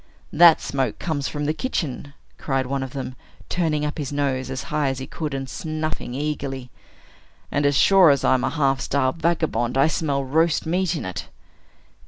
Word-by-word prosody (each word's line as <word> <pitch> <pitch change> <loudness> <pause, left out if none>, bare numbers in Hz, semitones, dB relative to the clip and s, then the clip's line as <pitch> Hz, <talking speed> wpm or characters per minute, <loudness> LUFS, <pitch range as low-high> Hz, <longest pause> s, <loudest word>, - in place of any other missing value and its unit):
"That 170 0 +7
smoke 135 -5 -2
comes 150 -5 -2
from 145 -1 -3
the 155 - +1
kitchen!" 145 - -3 0.2
cried 135 -2 -1
one 135 +1 -2
of 130 -1 -5
them, 135 -2 -5 0.4
turning 155 -4 0
up 150 +1 -4
his 145 -2 -3
nose 135 -3 -1
as 130 -1 -4
high 150 -2 +1
as 135 - -3
he 130 - -5
could, 150 -1 -4
and 135 0 -4
snuffing 155 -4 -4
eagerly. 135 -3 -4 0.8
"And, 145 0 +2
as 140 -1 +2
sure 190 0 +6
as 140 -1 +3
I'm 130 -1 +3
a - - +1
half 135 -4 +1
starved 140 +3 0
vagabond, 160 -7 0
I 135 - +5
smell 145 -3 0
roast 160 +5 +1
meat 180 +2 0
in 155 - -4
it." 95 - -5
145 Hz, 185 wpm, -23 LUFS, 135-155 Hz, 0.8 s, That